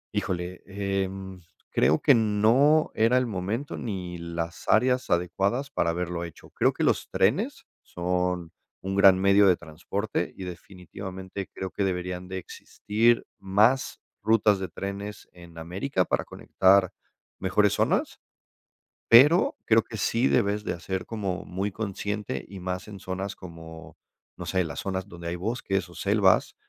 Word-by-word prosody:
Híjole, 90 -3 -3
em, 95 -1 -3 0.3
creo 75 +5 +3
que 145 - +5
no 115 +7 +3
era 115 +3 +3
el 130 - +2
momento 110 +6 -3
ni 90 -6 -5
las 85 0 -5
áreas 125 +3 +3
adecuadas 95 +10 0
para 85 - 0
haberlo 85 0 -2
hecho. 85 -2 -11
Creo - - +2
que - - -3
los - - +1
trenes - - 0 0.2
son 90 -1 -2 0.3
un 95 +1 -3
gran 100 -1 +7
medio 100 +1 +5
de 90 -2 +4
transporte 90 +4 -4
y, 95 - -6
definitivamente, 95 +1 -8
creo 95 -1 -6
que 100 - -2
deberían 90 -1 -3
de 95 0 -5
existir 110 +5 0
más 105 +7 +2 0.2
rutas 105 -1 +3
de 95 - -3
trenes 100 +3 -6
en 85 -1 -14
América 90 +5 -1
para - - -1
conectar 95 0 +3 0.5
mejores - - +2
zonas, - - 0 0.9
pero 145 +10 +6
creo 115 0 +5
que 110 - -8
sí 115 +5 +1
debes 105 +1 +1
de, - - -2
ah, - - -12
ser 95 +2 -4
como 100 -4 -3
muy 95 +2 -3
consciente 105 - -4
y 95 0 -9
más 90 +2 -4
en 100 -2 -9
zonas 95 +2 -4
como, 80 -2 -11 0.4
no - - -6
sé, 95 -1 +1
las 80 -4 -6
zonas 95 -1 -3
donde 85 -1 -8
hay 85 - -2
bosques 95 -1 -2
o 85 - -14
selvas, 100 -1 +2
95 Hz, 150 wpm, -26 LUFS, 90-105 Hz, 0.9 s, gran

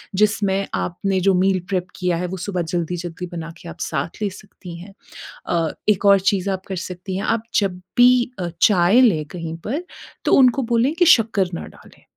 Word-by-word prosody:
जिसमें 200 -1 +1
आपने 190 +2 -1
जो - - +4
मील 190 0 +2
प्रेप 185 -2 -1
किया 180 -2 0
है 180 - -2
वो 190 +2 -5
सुबह 180 -3 -1
जल्दी-जल्दी 175 0 -3
बना 165 -1 -6
के 170 - -9
आप - - -11
साथ 155 +7 -4
ले 205 - +1
सकती 185 -3 -12
हैं। 195 +3 -12 0.5
अ, 165 -2 0 0.2
एक 205 -1 +2
और 200 -1 +6
चीज़ 195 0 -2
आप 190 0 -4
कर 190 - -4
सकती 185 +1 -6
हैं, - - -3
आप 225 -1 0 0.2
जब 185 -3 -2 0.2
भी 245 0 +5
अ, 175 -1 -2
चाय 195 +4 +5
लें 175 -12 +3
कहीं 165 -1 -5
पर 295 +10 -2 0.4
तो - - +3
उनको 260 0 +4
बोलें 245 +6 +2
कि 350 - +3
शक्कर 205 -5 -1
ना - - -6
डालें - - -18
190 Hz, 195 wpm, -21 LUFS, 175-210 Hz, 0.5 s, और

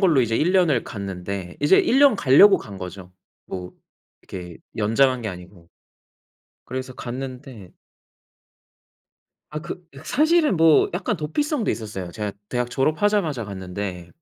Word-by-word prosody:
걸로 165 -9 +4
이제 115 -2 0
1 165 +8 +2
년을 170 -10 +3
갔는데 95 -2 -6
이제 145 +6 +5
1 265 - +3
년 280 -6 +6
가려고 195 +8 +6
간 100 -3 -10
거죠, 90 0 -8 0.3
뭐 90 -1 -7 0.5
이렇게 90 -3 -9 0.2
연장한 120 +4 +2
게 110 - -3
아니고. 90 -2 -11 1.0
그래서 130 0 -5
갔는데 125 -5 -7 1.8
아 150 0 -5
그 180 +2 -7 0.2
사실은 305 - +3
뭐 160 -1 +5
약간 195 +3 -1
도피성도 230 - -1
있었어요. 100 -5 -5
제가 105 -2 -4 0.2
대학 125 0 -2
졸업하자마자 155 - +1
갔는데 95 -2 -6
125 Hz, 270 characters per minute, -23 LUFS, 95-165 Hz, 1.8 s, 년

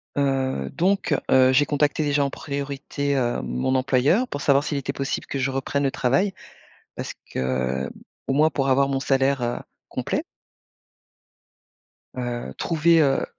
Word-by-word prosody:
Heu, 135 - 0
donc 185 -3 +2 0.2
heu, 130 0 +6
j'ai 145 +3 +4
contacté, 145 +1 +1
déjà, 145 -1 +2
en 140 - 0
priorité, 140 0 -3
heu, 120 - 0
mon 65 - -1
employeur, 135 - +2
pour 145 - -5
savoir 140 0 +4
s'il 150 -1 -2
était 140 0 -3
possible 135 -1 -3
que 140 - -4
je 130 0 +1
reprenne 135 +2 -1
le 135 - +1
travail. 135 +13 +1 0.6
Parce - - -5 0.2
que 65 0 -1 0.4
au - - 0
moins, 155 +3 +4
pour 135 -3 -1
avoir 135 +1 +3
mon 135 -1 -1
salaire, 135 -1 +1
heu, 120 0 -1 0.3
complet. - - -2 1.9
Heu, 120 - -4
trouver, 165 0 +3
heu 135 -2 +2
135 Hz, 150 wpm, -24 LUFS, 130-145 Hz, 1.9 s, heu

